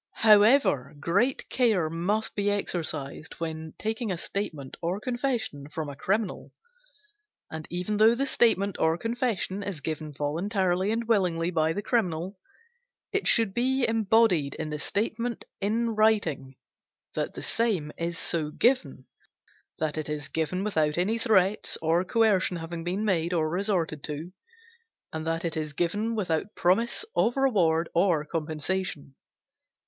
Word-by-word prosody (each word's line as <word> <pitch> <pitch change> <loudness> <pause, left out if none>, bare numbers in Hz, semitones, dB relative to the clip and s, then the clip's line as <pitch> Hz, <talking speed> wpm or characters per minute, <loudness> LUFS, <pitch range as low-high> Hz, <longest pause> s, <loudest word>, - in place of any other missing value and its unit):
However, 210 - +5
great 200 - +1
care 220 -10 +2
must 180 +7 -1
be 205 0 +1
exercised 160 -7 -3
when 160 -1 -5
taking 220 0 -2
a 180 - -2
statement 160 -8 -4
or 175 +4 -1
confession 240 - -2
from 155 -1 -4
a 140 - -7
criminal, 195 +7 -2 1.0
and 160 -1 -6
even 180 +4 -2
though 220 +2 +6
the 275 +3 0
statement 205 -7 +2
or 160 +1 +2
confession 230 -3 -1
is 200 -5 -4
given 155 +1 -4
voluntarily 180 - 0
and 225 +1 -1
willingly 180 -6 +1
by 160 -2 +2
the 205 +5 -3
criminal, 185 -5 -1 0.7
it 405 0 0
should 225 -4 +4
be 255 +2 +1
embodied 220 -9 +3
in 155 -1 -4
the 150 - -3
statement 230 +6 -2
in 230 +3 0
writing 205 -12 +1 0.6
that - - -3
the - - -6
same 200 -10 0
is 170 0 -3
so 160 -4 -1
given, 155 - +1 0.7
that 155 -1 -2
it 155 - -5
is 150 -1 -4
given 160 +4 -1
without 155 -7 +1
any 210 +6 +1
threats 205 -2 +2
or 165 +2 +2
coercion 195 -3 +2
having 165 0 -6
been 185 +5 -2
made 175 -4 +1
or 160 -2 +1
resorted 175 -4 -1
to, 155 +4 -6 0.8
and 160 0 -4
that 165 +1 -1
it 165 - -2
is 155 -2 -3
given 205 +9 -1
without 190 0 -2
promise 230 - +1
of 240 +3 +2
reward 175 -11 +3
or 170 -4 +2
compensation. 155 -1 -3
180 Hz, 145 wpm, -27 LUFS, 160-220 Hz, 1.0 s, though